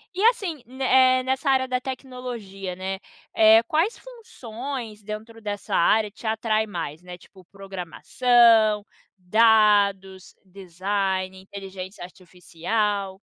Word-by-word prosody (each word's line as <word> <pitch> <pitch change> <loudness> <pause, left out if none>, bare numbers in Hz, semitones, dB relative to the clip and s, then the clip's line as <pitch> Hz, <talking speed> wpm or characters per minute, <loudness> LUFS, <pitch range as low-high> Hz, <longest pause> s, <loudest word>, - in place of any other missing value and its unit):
e 385 - -1
assim, 345 - -5 0.2
eh, 255 0 +4
nessa 265 +2 -2
área 260 -1 +2
da 255 0 -1
tecnologia, 245 -8 -7
né, 190 +1 -4 0.4
eh, 220 +1 +7
quais 325 - 0
funções 255 - -8
dentro 215 +2 -8
dessa 205 -1 -4
área 210 +5 +3
te 215 - -15
atrai 220 0 0
mais, 170 -5 -6
né? 180 0 -10
Tipo, 185 -2 -19
programação, 210 +4 +2 0.3
dados, 200 -1 +2
design, 190 0 -3
inteligência 190 0 -9
artificial? 190 +3 -4
210 Hz, 110 wpm, -24 LUFS, 190-240 Hz, 0.4 s, eh